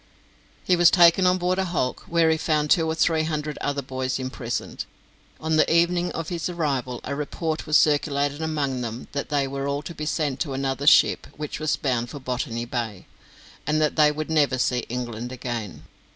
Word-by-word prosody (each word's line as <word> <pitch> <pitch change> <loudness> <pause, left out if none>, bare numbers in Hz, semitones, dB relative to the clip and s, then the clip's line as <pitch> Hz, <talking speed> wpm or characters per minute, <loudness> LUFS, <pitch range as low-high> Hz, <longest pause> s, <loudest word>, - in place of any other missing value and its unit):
He 180 - +3
was 175 -1 +6
taken 175 +1 +6
on 180 0 +3
board 180 +1 0
a 190 - +1
hulk, 160 -8 -2
where 165 -1 +3
he 160 - +2
found 150 -2 0
two 165 -2 +4
or 160 - -1
three 160 -1 +2
hundred 155 -1 -3
other 145 -1 -2
boys 130 0 -3
imprisoned. 130 -2 -4 0.5
On 160 0 0
the - - +3
evening 175 +1 +2
of 165 -1 -4
his 170 0 -3
arrival 135 -8 -2
a 140 - -4
report 155 +3 -3
was 155 0 +5
circulated 145 -1 +1
among 145 -5 -1
them 115 0 -6
that 140 - -4
they 140 -2 +1
were 140 +1 -3
all 140 +1 -2
to 170 - -7
be 150 -1 -5
sent 145 -4 -1
to 145 -5 -2
another 135 +1 -2
ship, - - +5
which 150 -1 -5
was 155 -1 +1
bound 120 -4 -1
for 145 - -7
Botany 125 -2 -3
Bay, 115 -5 -4 0.6
and 155 +1 +2
that 155 -1 +1
they 150 -1 +5
would 155 +1 -4
never 145 -4 +3
see 125 -1 0
England 120 0 -4
again. 120 -6 -5
145 Hz, 195 wpm, -24 LUFS, 130-160 Hz, 0.6 s, was